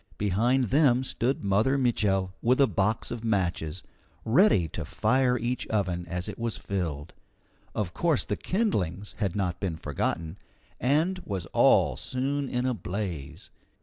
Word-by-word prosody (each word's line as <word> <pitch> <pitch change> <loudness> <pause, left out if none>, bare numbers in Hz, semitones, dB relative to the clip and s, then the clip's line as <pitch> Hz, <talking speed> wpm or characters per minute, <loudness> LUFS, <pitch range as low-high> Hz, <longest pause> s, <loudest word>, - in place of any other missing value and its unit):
Behind 115 +7 +2
them 135 -3 +4
stood 130 0 -1
Mother 105 +8 +2
Mitchel 100 -7 +1
with 125 +3 +3
a 140 - +7
box 105 -2 -1
of 120 -1 -5
matches, 90 -6 -1 0.4
ready 115 - +4
to - - -5
fire 130 -1 +2
each 120 +1 -2
oven 90 -5 -1
as 90 +1 -3
it - - -7
was 115 -1 -2
filled. 80 -6 -4 0.6
Of 100 -6 -2
course 165 -6 +1
the - - -1
kindlings 105 - -1
had 100 -5 -1
not 90 -3 -1
been 95 -4 -2
forgotten, 80 +4 -3 0.4
and 160 +8 +1
was 100 - -4
all - - +4
soon 135 +2 -2
in 125 0 -1
a 130 - +1
blaze. 90 - -5
105 Hz, 150 wpm, -27 LUFS, 90-130 Hz, 0.6 s, a